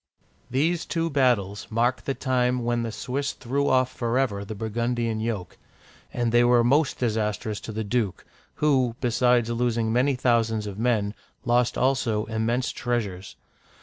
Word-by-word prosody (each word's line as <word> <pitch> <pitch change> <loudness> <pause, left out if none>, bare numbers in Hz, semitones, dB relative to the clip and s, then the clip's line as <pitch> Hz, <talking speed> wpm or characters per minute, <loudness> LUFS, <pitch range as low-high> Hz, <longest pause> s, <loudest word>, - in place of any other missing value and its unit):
These 160 +7 0
two 165 -1 -1
battles 120 -8 +1
mark 120 +3 0
the 135 - -1
time 125 -2 0
when 120 0 0
the 115 -1 -3
Swiss 140 +5 -3
threw 140 +3 -1
off 130 0 +2
forever 120 -4 0
the 110 +2 -7
Burgundian 115 +1 -1
yoke; 110 -5 -4 0.5
and 120 -2 -1
they 120 +1 +5
were 120 0 +5
most 140 +5 +2
dis 115 -4 0
astrous 105 0 -2
to - - -7
the 110 +1 -3
duke, 105 -4 -2 0.3
who, 130 -6 +2
besides 120 -1 +2
losing 115 -1 0
many 130 +3 +2
thousands 115 -3 +1
of 100 0 -6
men, 110 -4 +1 0.3
lost 120 0 +2
also 125 -5 +1
immense 115 +3 -1
treasures. 105 -7 -3
120 Hz, 150 wpm, -25 LUFS, 110-125 Hz, 0.5 s, they